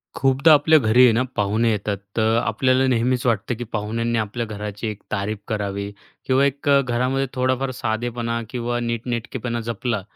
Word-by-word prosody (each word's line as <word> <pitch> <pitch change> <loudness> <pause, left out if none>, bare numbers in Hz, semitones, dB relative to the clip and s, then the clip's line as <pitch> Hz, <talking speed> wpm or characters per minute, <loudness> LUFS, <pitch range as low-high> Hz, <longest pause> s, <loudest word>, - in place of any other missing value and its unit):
खूपदा 135 +4 +4
आपल्या 155 +2 +5
घरी 120 +2 +4
आहे 125 - +7
ना, 115 - +2
पाहुणे 110 +3 +1
येतात, 100 -1 -2 0.2
तर 110 +1 +3
आपल्याला 130 +3 +2
नेहमीच 125 0 +1
वाटतं, 115 0 0
की 120 - -5
पाहुण्यांनी 115 +1 -2
आपल्या 110 +2 -3
घराची 105 0 -5
एक 105 -1 -6
तारीफ 105 +1 -2
करावी 100 -2 -3 0.3
किंवा 130 +1 +3
एक 140 +1 -1
अ, 140 -1 +6
घरामध्ये 130 +2 0
थोडाफार 130 +1 0
साधेपणा 115 0 -2
किंवा 120 -1 -2
नीट-नेटकेपणा 120 0 -3
जपला, 115 -1 -2
120 Hz, 160 wpm, -22 LUFS, 110-130 Hz, 0.3 s, आहे